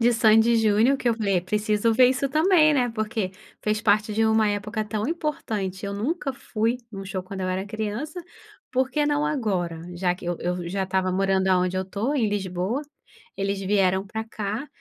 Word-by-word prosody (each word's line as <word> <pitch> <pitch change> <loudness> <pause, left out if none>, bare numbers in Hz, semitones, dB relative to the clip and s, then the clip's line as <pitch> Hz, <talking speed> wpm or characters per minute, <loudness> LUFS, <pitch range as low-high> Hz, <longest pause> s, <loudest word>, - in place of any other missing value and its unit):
de 240 +1 +4
Sandy 225 +1 +5
e 230 - +4
Junior 225 +4 +4
que 250 - -1
eu 230 - +3
falei: 200 -5 +1
"Preciso 210 +3 +1
ver 250 +2 +6
isso 265 +2 0
também, 310 +1 +4
né. 250 -3 +2
Porque 215 -3 -2 0.3
fez 215 +1 0
parte 210 0 +2
de 225 - +2
uma 220 -1 +3
época 210 +2 -2
tão 210 +1 -2
importante, 215 - -3
eu 200 - -3
nunca 275 - -2
fui 235 -1 -1
em - - -8
um 195 - -6
show 185 -1 -4
quando 190 +1 -7
eu 185 - -1
era 185 +2 -2
criança, 220 - -4 0.5
por 260 +1 +1
que 300 -1 +1
não 295 0 +1
agora?" 185 - -1
Já 180 0 0
que 180 - -12
eu, 175 0 -1
eu 180 0 -2
já 190 +2 -1
estava 185 -1 0
morando 190 0 +1
aonde 185 0 +2
eu 185 - 0
estou, 205 +9 -2
em 235 -7 +2
Lisboa, 195 +4 -2 0.6
eles 195 0 -1
vieram 190 -1 +2
para 220 +1 -4
cá, 215 +4 -4
215 Hz, 205 wpm, -25 LUFS, 190-235 Hz, 0.6 s, ver